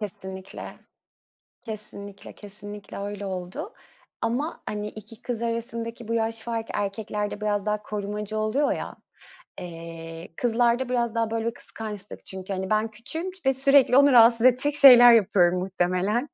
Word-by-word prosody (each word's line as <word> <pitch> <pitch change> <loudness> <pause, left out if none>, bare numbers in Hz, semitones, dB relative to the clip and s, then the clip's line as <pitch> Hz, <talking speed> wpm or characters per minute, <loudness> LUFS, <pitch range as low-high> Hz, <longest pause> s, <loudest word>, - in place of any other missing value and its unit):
Kesinlikle. 190 -2 -8 0.9
Kesinlikle, 205 -2 -8
kesinlikle 205 0 -10
öyle 205 0 -5
oldu. 180 -1 -6 0.5
Ama, 250 +8 -2
hani, 210 0 -3
2 215 +2 -12
kız 235 -2 -4
arasındaki 230 0 -4
bu 230 - -1
yaş 225 0 -1
farkı 230 -1 -4
erkeklerde 205 +1 -3
biraz 205 -1 -1
daha 210 0 -1
korumacı 210 +1 -4
oluyor, 215 +7 +1
ya. - - -5 0.6
Eee, 165 -1 -8
kızlarda 240 +1 +1
biraz 240 -2 0
daha 230 -1 0
böyle 225 0 -2
bir 230 - -1
kıskançlık 210 -4 -8
çünkü, 190 +1 -7
hani, 190 0 -3
ben 215 +1 +1
küçüğüm 320 - -5 0.2
ve 270 - +5
sürekli 270 -1 +4
onu 280 0 +6
rahatsız 230 0 +6
edecek 270 +4 +3
şeyler 245 -4 +10
yapıyorum, 185 -5 +4
muhtemelen. 185 +7 0
215 Hz, 140 wpm, -25 LUFS, 200-235 Hz, 0.9 s, şeyler